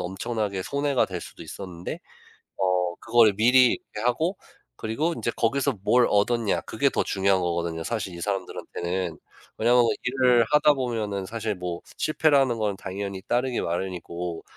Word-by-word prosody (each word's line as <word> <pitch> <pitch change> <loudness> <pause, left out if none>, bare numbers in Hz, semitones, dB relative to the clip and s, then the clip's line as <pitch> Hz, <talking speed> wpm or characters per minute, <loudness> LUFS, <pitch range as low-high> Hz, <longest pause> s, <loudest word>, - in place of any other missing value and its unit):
엄청나게 100 +1 -3
손해가 140 +1 +1
될 90 -2 -5
수도 - - -10
있었는데 90 -3 -7 0.6
어 90 -2 +1
그거를 115 -3 +5
미리 125 +3 +5
이렇게 - - -8
하고 160 +10 0 0.4
그리고 145 - -1
인제 120 - -2
거기서 135 +1 +1
뭘 120 +2 +4
얻었냐 110 +1 +2
그게 - - 0
더 - - 0
중요한 95 -1 +1
거거든요, 85 -1 -2
사실 100 -3 -3
이 85 - -8
사람들한테는. 90 -2 -3 0.4
왜냐하면 120 +2 +5 0.2
일을 125 -2 +3
하다 150 0 +5
보면은 110 -7 -2
사실 110 0 -3
뭐 90 -1 -5 0.2
실패라는 140 -6 +2
건 105 -2 -1
당연히 100 0 -5
따르기 125 +2 0
마련이고, 85 -1 -4
105 Hz, 350 characters per minute, -25 LUFS, 95-125 Hz, 0.6 s, 그거를